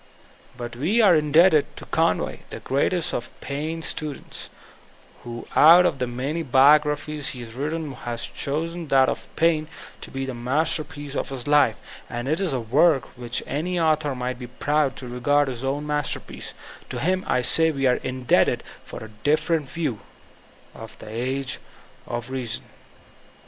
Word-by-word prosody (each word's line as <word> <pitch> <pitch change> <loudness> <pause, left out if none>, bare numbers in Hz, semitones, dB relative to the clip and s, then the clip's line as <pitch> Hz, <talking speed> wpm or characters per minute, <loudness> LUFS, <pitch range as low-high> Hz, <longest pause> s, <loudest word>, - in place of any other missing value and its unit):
But 120 -2 -6
we 170 - +1
are 205 -6 +7
indebted 155 +1 +4
to - - -8
Conway, - - 0
the - - -7
great 135 +2 +1
est 175 -3 -1
of 120 - -4
Paine 155 +4 -4
students, 150 -3 -5 0.7
who 120 -1 -7
out 170 +4 +8
of 140 - +1
the 125 - 0
many 135 +7 -3
biograi^ies 150 +2 +3
he 125 - -8
has 115 -1 -9
written 150 +3 -3
has 120 -2 -5
chosen 165 +4 -3
that 135 -1 +4
of - - -4
Paine 160 -1 +2 0.3
to - - -7
be 135 0 -4
the 130 - -4
master 135 +6 +1
piece 145 -1 -9
of - - -2
his 130 -3 -5
life 145 0 +4 0.3
(and 120 +1 -4
it 155 +4 +1
is 185 -5 0
a 130 - 0
work 135 +5 +2
which 125 0 -3
any 175 +6 -2
author 155 -3 +2
nugfat 125 0 -3
be 125 - -7
proud 140 +2 0
to 130 - -8
regard 145 +4 +2
his 125 -3 -5
master 145 +2 -1
piece), - - -9 0.3
to - - -4
him 185 +3 0
I 125 - +1
say 160 +6 +4
we 135 -3 -1
are 125 -1 +4
indebted 130 -1 +1 0.2
for - - -8
a 110 - -9
different 155 -1 +1
view 150 -10 -2 0.7
of 115 -1 -11
the - - -11
''Age 125 +4 -2 0.5
of 120 +1 -5
Reason." 125 -4 -3
140 Hz, 170 wpm, -24 LUFS, 125-155 Hz, 0.7 s, out